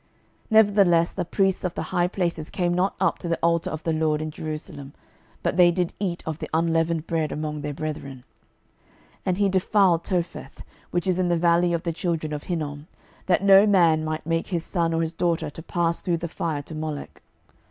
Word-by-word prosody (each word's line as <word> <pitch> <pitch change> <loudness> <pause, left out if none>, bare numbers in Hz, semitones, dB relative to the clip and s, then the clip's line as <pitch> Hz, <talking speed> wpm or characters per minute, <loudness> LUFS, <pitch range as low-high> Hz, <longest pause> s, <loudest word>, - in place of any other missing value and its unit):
12:023:009 - - -39 0.4
Nevertheless 200 -6 +5
the 180 - -3
priests 190 +1 +1
of 180 -2 -2
the - - -2
high 175 -1 0
places 170 -4 -2
came 175 -1 0
not 185 +3 +1
up 185 -3 +1
to - - -6
the 165 - 0
altar 170 0 +2
of 155 0 -6
the 165 - 0
LORD 155 -1 +1
in 155 0 -4
Jerusalem, 150 -3 -7 0.5
but - - 0
they 175 -1 +7
did 175 0 -1
eat 180 -4 -2
of 160 -1 -4
the - - -6
unleavened 165 0 +1
bread 160 -2 -1
among 150 -1 -4
their 145 0 -3
brethren. 140 -4 -6 0.9
12:023:010 - - -38
And 185 -1 +1
he 200 -1 +2
defiled 185 -2 +3
Topheth, 170 -6 -4 0.3
which 175 -1 -1
is 185 -1 +1
in 185 - +2
the 170 - +2
valley 170 +1 +3
of 170 -1 -1
the 170 - -2
children 160 -3 -2
of 150 - -5
Hinnom, 150 -3 -4 0.4
that 185 +1 +2
no 195 +1 +7
man 170 -6 +4
might 155 0 -3
make 165 0 -1
his 175 -3 -2
son 170 -2 0
or 165 - +1
his 165 0 -2
daughter 170 -3 -1
to 160 - -9
pass 170 0 -1
through 175 -3 0
the 170 +1 -4
fire 155 -3 -3
to 160 - -9
Molech. 155 -2 -6
170 Hz, 210 wpm, -24 LUFS, 155-180 Hz, 0.9 s, they